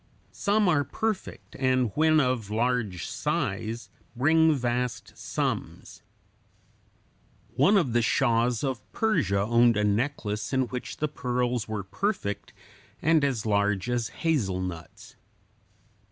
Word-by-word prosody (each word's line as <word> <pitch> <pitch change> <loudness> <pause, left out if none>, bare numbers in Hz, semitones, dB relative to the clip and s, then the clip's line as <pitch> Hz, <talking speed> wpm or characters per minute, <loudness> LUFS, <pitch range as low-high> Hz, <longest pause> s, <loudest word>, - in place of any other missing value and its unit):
Some 205 0 +1
are 155 -5 +3
perfect, 215 +8 -4
and 130 -3 +2
when 155 0 +4
of 125 -6 0
large 110 -5 -1
size 115 +2 -3 0.2
bring 160 +4 +4
vast 120 -5 -2
sums. - - -4 1.5
One 205 +3 +5
of 140 - +1
the 120 - +3
shahs 120 0 +2
of 130 -5 -2
Persia 100 - +1
owned 120 +1 +4
a 105 - +1
necklace 105 0 -1
in 130 - +3
which 125 -1 -6
the 150 - 0
pearls 125 -4 -2
were 110 -2 -3
perfect 105 - -3 0.5
and 160 -1 +3
as 130 -6 0
large 100 +1 +1
as 120 -2 0
hazelnuts. 95 - -3
120 Hz, 115 wpm, -27 LUFS, 105-145 Hz, 1.5 s, One